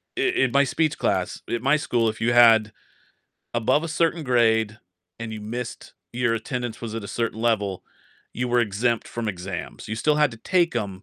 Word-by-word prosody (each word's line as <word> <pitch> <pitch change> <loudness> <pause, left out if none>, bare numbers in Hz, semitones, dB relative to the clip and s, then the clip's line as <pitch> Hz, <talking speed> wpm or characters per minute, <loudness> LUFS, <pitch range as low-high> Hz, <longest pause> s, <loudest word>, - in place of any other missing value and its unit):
in 370 0 +1
my 140 0 +4
speech 155 +3 0
class - - -1
at 120 +1 -2
my 140 +2 +4
school, 120 -6 0
if 110 +1 -3
you 120 +1 +2
had 115 -2 +6 0.8
above 130 +6 +2
a 165 - -4
certain 165 +1 0
grade 110 -4 +2 0.4
and 115 -1 -5
you 110 - -6
missed 115 +3 -6 0.2
your 125 -1 +1
attendance 120 0 -4
was 115 -2 -5
at 115 - -4
a 100 - -8
certain 115 -1 -2
level, 105 -5 0 0.5
you 125 +1 -2
were 120 0 +2
exempt 115 +2 0
from 115 -1 -4
exams. 95 0 -6
You 110 - -3
still 150 +5 +2
had 150 -2 +3
to 115 - -10
take 170 - +1
'em, 100 -3 -4
120 Hz, 190 wpm, -24 LUFS, 110-130 Hz, 0.8 s, had